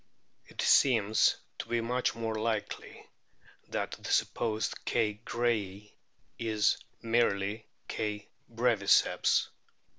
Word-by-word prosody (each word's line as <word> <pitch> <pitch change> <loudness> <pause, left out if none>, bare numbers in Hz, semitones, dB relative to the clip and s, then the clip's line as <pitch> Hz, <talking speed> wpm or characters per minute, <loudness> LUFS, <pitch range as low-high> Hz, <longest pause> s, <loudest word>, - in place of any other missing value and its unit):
It - - -6
seems 110 -5 +4 0.2
to - - -5
be 120 - +1
much 125 +2 -1
more 115 -1 -3
likely 110 -1 -3 0.6
that - - -3
the - - -6
supposed 110 -2 0
K. 105 -2 0
grayi 105 -5 -2 0.5
is 110 -2 +1 0.2
merely 110 -2 0 0.2
K. 105 -1 -3 0.2
breviceps. 115 -4 +3
110 Hz, 95 wpm, -30 LUFS, 105-115 Hz, 0.6 s, seems